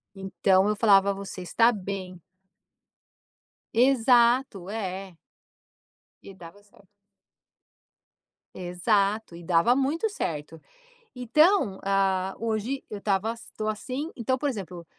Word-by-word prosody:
Então 190 0 +1
eu 210 - 0
falava: 200 -2 +4
"Você 195 -1 -7
está 230 +6 +3
bem". 185 -3 -6 1.5
Exato 240 -4 +3
é. 190 -4 -5 1.1
E 195 - -11
dava 185 +2 -14
certo. 205 0 -24 1.7
Exato, 195 +3 0
e 170 - -10
dava 170 +8 +3
muito 290 +10 0
certo. 160 - -5 0.6
Então, 250 - +2
hã, 195 -1 +1
hoje 230 +4 -2
eu 210 - -6
estava 200 +1 -1
eu - - -7 0.2
tô 215 0 -3
assim, 255 +9 -4
então 260 +3 -1
por 290 0 0
exemplo, 180 -7 -7
200 Hz, 110 wpm, -26 LUFS, 190-235 Hz, 1.7 s, falava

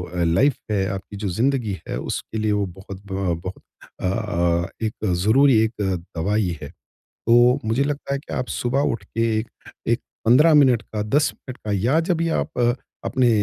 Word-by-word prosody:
Life 90 +11 +3 0.2
है 95 -2 +1
आपकी 95 +1 -7
जो 100 0 -3
ज़िंदगी 115 +2 0
है - - -3
उसके 110 - -4
लिए 110 0 +1
वो 105 -1 +1
बहुत 95 +1 -10
ब 95 -3 0
बहुत 95 0 -6 0.4
अ, 85 -3 0 0.2
एक 110 0 -4 0.2
ज़रूरी 130 +3 +5
एक 110 - 0 0.5
दवाई 95 0 0
है। 75 - -7 0.4
तो 120 +3 +3
मुझे 115 +5 +2
लगता 140 -1 -2
है 140 - -1
कि - - -9
आप 125 - -2
सुबह 125 +3 -1
उठ 115 - -6
के 115 - -4 0.2
एक 110 - -5 0.4
एक - - +2 0.3
15 145 +8 +6
मिनट 130 -6 +5
का, 105 -2 -4
10 140 +8 +2
मिनट 130 -1 -10
का 105 - -5
या 120 - +2
जब 170 +1 0
भी 165 0 0
आप 160 - -2 0.5
अपने 125 -2 +2
110 Hz, 180 wpm, -22 LUFS, 95-135 Hz, 0.5 s, 15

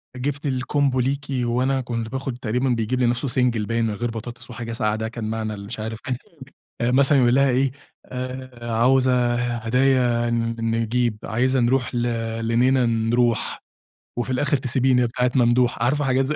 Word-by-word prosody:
جِبت 140 +3 -3
الCombo 135 +1 0
ليكِ 135 +2 0 0.2
وأنا 130 +3 +1
كنت 115 -2 -4
باخد 130 -1 -4
تقريبًا 125 +2 -1
بيجيب 120 +1 0
لنفسه 120 +2 +1
single 120 -3 +1
باين 115 0 0
من 110 - -1
غير 120 +3 -3
بطاطس 120 +2 -8
وحاجة 120 -1 -6
ساقعة 105 -2 0
ده 110 0 -3
كان 115 -2 -5
معنى 110 -1 -3
المش 100 +3 -7
عارف 110 +1 -5 0.8
آآ، 120 - +2
مثلًا 140 +2 +4
يقول 125 -1 +4
لها 140 0 +4
إيه 130 +1 +2 0.3
آآ، 125 -2 -6
عاوزة 125 0 +3
هدايا 120 0 +1 0.3
نجيب 115 0 0
عايزة 130 +4 +1
نروح 125 +1 +1
ل 120 - 0 0.4
لنينه 125 +2 +3
نروح، 115 0 0 0.5
وفي 120 - -2
الآخر 140 +3 +1
تسيبيني 130 0 +2
يا - - +3
بتاعة 125 +1 0
ممدوح 120 -1 +3
عارفة 145 +4 +1
حاجات 130 0 +2
زي. 150 +3 -1
125 Hz, 160 wpm, -23 LUFS, 115-130 Hz, 0.8 s, مثلًا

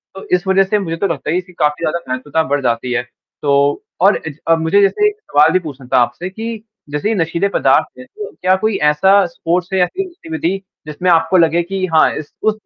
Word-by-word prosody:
तो 195 - -9
इस 180 +2 -3
वज़ह 190 0 +4
से 210 +2 0
मुझे 165 -4 -3
तो 200 +3 0
लगता 155 -2 -3
है 180 +2 +1
कि 180 0 -19
काफ़ी 150 +2 0
ज़्यादा 170 +1 0
महत्वता 145 +5 -1
बढ़ 145 -2 -1
जाती 120 +1 -1
है। 120 - 0 0.4
तो 140 0 +1 0.2
और 200 +3 +5
अज 150 -1 -7
अ, 165 - +5
मुझे 165 +5 +2
जैसे 415 - +3
एक 420 - -2 0.2
सवाल 150 +2 +5
भी 185 - +4
पूछना 140 -6 -9
था - - +5
आपसे 120 +10 -2
कि 220 +2 -6 0.3
जैसे 150 +9 -2
ये 225 - 0
नशीले 170 +1 0
पदार्थ - - +2
हैं 255 - -10
तो 425 +1 -6
क्या 185 +1 +3
कोई 215 -3 +1
ऐसा 190 +6 +4
स्पोर्ट्स 175 +2 -2
है 190 - +2
या 180 - +5
कोई 385 - -4
गतिविधि 175 - -4 0.3
जिसमें 180 +5 -2
आपको 165 +2 +3
लगे 170 0 +3
कि 190 +1 -3
हाँ, 160 - +5
इस 150 -1 -8
उस 215 -1 +2
170 Hz, 230 wpm, -17 LUFS, 150-195 Hz, 0.4 s, और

